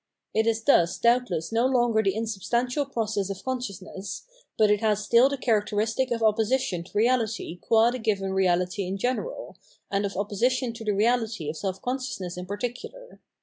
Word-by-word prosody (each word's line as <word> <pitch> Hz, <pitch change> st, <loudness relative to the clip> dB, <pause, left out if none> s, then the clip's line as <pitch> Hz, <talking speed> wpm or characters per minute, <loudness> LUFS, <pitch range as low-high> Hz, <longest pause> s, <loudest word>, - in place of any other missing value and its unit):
It 220 Hz, +1 st, +2 dB
is 225 Hz, 0 st, +1 dB
thus 175 Hz, -11 st, +4 dB
doubtless 235 Hz, -8 st, +1 dB
no 230 Hz, +3 st, +2 dB
longer 240 Hz, -4 st, +2 dB
the 195 Hz, -2 st, 0 dB
insubstantial 235 Hz, -, -1 dB
process 220 Hz, -6 st, -2 dB
of 195 Hz, 0 st, -6 dB
con 260 Hz, -1 st, -1 dB
sciousness; 195 Hz, -3 st, -7 dB, 0.3 s
but 215 Hz, -1 st, +4 dB
it 210 Hz, -, +3 dB
has 210 Hz, -2 st, +1 dB
stih 240 Hz, +3 st, +6 dB
the 280 Hz, -, -3 dB
characteristic 225 Hz, +1 st, 0 dB
of 235 Hz, -1 st, -1 dB
opposi 220 Hz, +3 st, +3 dB
tion 180 Hz, -10 st, -3 dB
to -, -, -16 dB
reahty 220 Hz, -5 st, 0 dB
qua 225 Hz, +1 st, +4 dB
the 255 Hz, -, -4 dB
given 200 Hz, -4 st, -1 dB
reahty 185 Hz, 0 st, +1 dB
in 190 Hz, +2 st, -3 dB
general, 255 Hz, -, -3 dB, 0.3 s
and 200 Hz, 0 st, +1 dB
of 200 Hz, -2 st, -3 dB
opposition 235 Hz, +5 st, 0 dB
to 230 Hz, -, -9 dB
the 215 Hz, -, -2 dB
reahty 225 Hz, -4 st, +1 dB
of 160 Hz, -, -10 dB
self 190 Hz, 0 st, -4 dB
consciousness 245 Hz, -8 st, -3 dB
in 180 Hz, 0 st, -7 dB
par 200 Hz, +2 st, -4 dB
ticular. 255 Hz, -, -7 dB
220 Hz, 185 wpm, -26 LUFS, 195-245 Hz, 0.3 s, stih